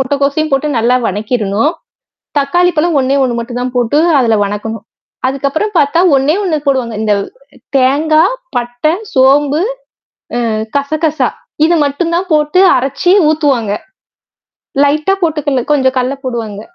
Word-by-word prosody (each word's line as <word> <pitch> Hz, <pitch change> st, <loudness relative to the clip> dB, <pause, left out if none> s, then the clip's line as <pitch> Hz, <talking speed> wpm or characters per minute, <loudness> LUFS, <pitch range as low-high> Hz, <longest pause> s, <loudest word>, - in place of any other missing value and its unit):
முட்டைக்கோசையும் 280 Hz, +3 st, 0 dB
போட்டு 275 Hz, +2 st, +1 dB
நல்லா 240 Hz, +2 st, +2 dB
வணக்கிரணும். 210 Hz, -, -1 dB, 0.7 s
தக்காளிப்பழம் 335 Hz, +2 st, +1 dB
ஒண்ணே 265 Hz, +1 st, +1 dB
ஒண்ணு 250 Hz, -2 st, 0 dB
மட்டும் 240 Hz, +1 st, -5 dB
தான் 250 Hz, 0 st, -4 dB
போட்டு 245 Hz, +4 st, +1 dB, 0.2 s
அதில 230 Hz, -4 st, +2 dB
வணக்கணும். 210 Hz, +2 st, -5 dB, 0.4 s
அதுக்கப்புறம் 280 Hz, +10 st, -2 dB
பார்த்தா 290 Hz, +4 st, +2 dB, 0.2 s
ஒண்ணே 275 Hz, +4 st, +2 dB
ஒண்ணு 350 Hz, -6 st, 0 dB
போடுவாங்க. 260 Hz, -5 st, 0 dB
இந்த 215 Hz, -1 st, +1 dB, 0.6 s
தேங்காய், 310 Hz, -, +2 dB, 0.2 s
பட்டை, 245 Hz, +5 st, -1 dB, 0.2 s
சோம்பு, 280 Hz, +3 st, +3 dB, 0.8 s
அ -, -, 0 dB, 0.4 s
கசகசா. 310 Hz, +2 st, 0 dB, 0.4 s
இது 335 Hz, +2 st, +3 dB
மட்டும் 305 Hz, +4 st, -2 dB
தான் 365 Hz, +2 st, -2 dB
போட்டு 300 Hz, +4 st, +2 dB, 0.2 s
அரைச்சு 275 Hz, +7 st, 0 dB, 0.2 s
ஊத்துவாங்க. 275 Hz, -9 st, 0 dB, 1.1 s
லைட்டா 305 Hz, +6 st, +1 dB
போட்டு 320 Hz, -2 st, 0 dB
கல 270 Hz, -3 st, +1 dB
கொஞ்சம் 265 Hz, -2 st, +1 dB
கடலை 255 Hz, +2 st, -1 dB
போடுவாங்க. 225 Hz, -5 st, -4 dB
275 Hz, 125 wpm, -13 LUFS, 245-310 Hz, 1.1 s, சோம்பு